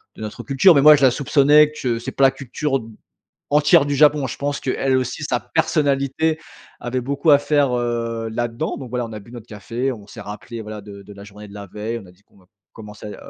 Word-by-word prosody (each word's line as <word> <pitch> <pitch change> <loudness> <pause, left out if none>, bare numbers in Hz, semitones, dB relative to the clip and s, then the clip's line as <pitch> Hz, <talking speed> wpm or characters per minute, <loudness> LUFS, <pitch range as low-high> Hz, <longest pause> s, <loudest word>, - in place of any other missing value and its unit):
de - - -12
notre 105 -1 -7
culture», 150 +6 +4
mais, 140 - +5
moi, 150 +1 +9
je 140 - -1
la 130 - +6
soupçonnais 145 +3 +4
que 125 -6 -2
c'est 115 - -6
pas 135 - 0
la 135 - +5
culture 135 +1 -3
d 110 - -12 0.6
entière 150 +1 +4
du 145 - -1
Japon. 150 -1 +4
Je - - -6
pense 145 0 -3
qu'elle 130 0 0
aussi, 130 - -4
sa - - -1
personnalité 145 +2 0 0.4
avait 125 +1 -3
beaucoup 140 +5 0
à 145 - +7
faire, 145 -2 +1
heu, 115 -2 -2
là-dans. 120 +6 -3
Donc, 125 -4 -9
voilà, 125 -2 -2
on 115 - -11
a 105 - -7
bu 115 +4 -16
notre 120 -3 -10
café, 115 +4 -4
on 105 -5 -8
s'est - - -11
rappelé, 105 +3 -8
voilà, 105 -1 -8
de 100 -1 -11
de 100 +1 -13
la 100 0 -12
journée 105 0 -12
de 100 - -14
la 100 -1 -8
veille. 110 +5 -5
On 105 - -13
a 90 - -16
dit 90 - -28
qu'on - - -30
va 95 - -23 0.3
commencer, 105 -1 -11
heu, 105 - -8
125 Hz, 245 wpm, -20 LUFS, 110-140 Hz, 0.6 s, moi